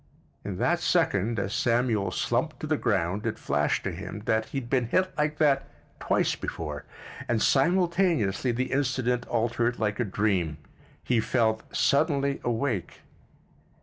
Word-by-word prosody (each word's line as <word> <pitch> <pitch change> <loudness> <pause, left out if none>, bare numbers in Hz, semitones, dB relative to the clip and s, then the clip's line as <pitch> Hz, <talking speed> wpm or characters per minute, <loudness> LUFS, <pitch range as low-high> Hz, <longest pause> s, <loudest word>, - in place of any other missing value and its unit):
In - - -5
that - - +1
second, 105 +4 +1
as 100 0 -2
Samuel 115 -4 +1
slumped 125 +7 -1
to - - -3
the 155 0 +1
ground, 100 - 0
it - - -2
flashed - - 0
to - - -2
him 105 - -7
that 110 0 +1
he 110 - -6
had 120 - -9
been 125 -2 +1
hit 185 +8 +1
like 150 0 0
that 145 -3 +2 0.3
twice - - +1
before, 75 -3 -5 0.4
and 120 -2 +1
simultaneously 170 - +2
the 130 +2 -2
incident 125 -3 0
altered 120 +1 0
like 105 -1 -1
a - - +3
dream—he 95 - -2
felt 110 -1 +1
suddenly 140 -1 +2
awake. 115 -5 -2
120 Hz, 145 wpm, -27 LUFS, 105-140 Hz, 0.4 s, a